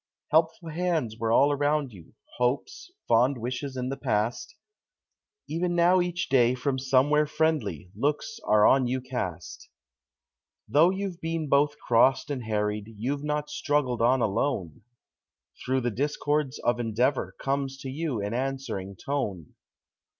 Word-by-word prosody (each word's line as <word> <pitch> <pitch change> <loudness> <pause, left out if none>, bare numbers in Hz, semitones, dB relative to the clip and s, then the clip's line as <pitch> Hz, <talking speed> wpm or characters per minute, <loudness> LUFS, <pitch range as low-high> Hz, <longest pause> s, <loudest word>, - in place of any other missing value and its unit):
Helpful 160 +2 +2
hands 160 -9 -1
were 115 -1 0
all 140 +5 +5
around 145 -2 0
you 90 -5 -15 0.2
hopes, 125 - -1 0.2
fond 125 +4 +3
wishes 130 +3 -4
in 125 0 -2
the 135 - -4
past; 115 - -1 0.9
Even 175 +2 -1
now 175 +2 +4
each 175 0 -2
day 125 -2 +3
from 130 +1 -1
somewhere 140 +3 +3
friendly 120 - -1
looks 150 +10 -2
are 105 0 +5
on 130 -2 +4
you 130 +2 -1
cast. 125 -10 -6 1.0
Though 160 +4 +5
you've 190 -2 -4
been 165 -2 -2
both 145 +2 +3
crossed 130 +4 +3
and 130 -5 -4
harried, 105 0 -2
you've 140 +6 -2
not 150 0 -2
struggled 145 -7 0
on 125 +2 +3
alone; 100 - -1 0.8
Through 130 +1 0
the 120 0 -1
discords 145 +2 -1
of 120 0 0
endeavor 120 +4 0
comes 135 0 -2
to 135 - -5
you 140 -7 -2
an 105 +2 -3
answering 130 -7 -3
tone. 100 - -4
135 Hz, 140 wpm, -27 LUFS, 120-150 Hz, 1.0 s, all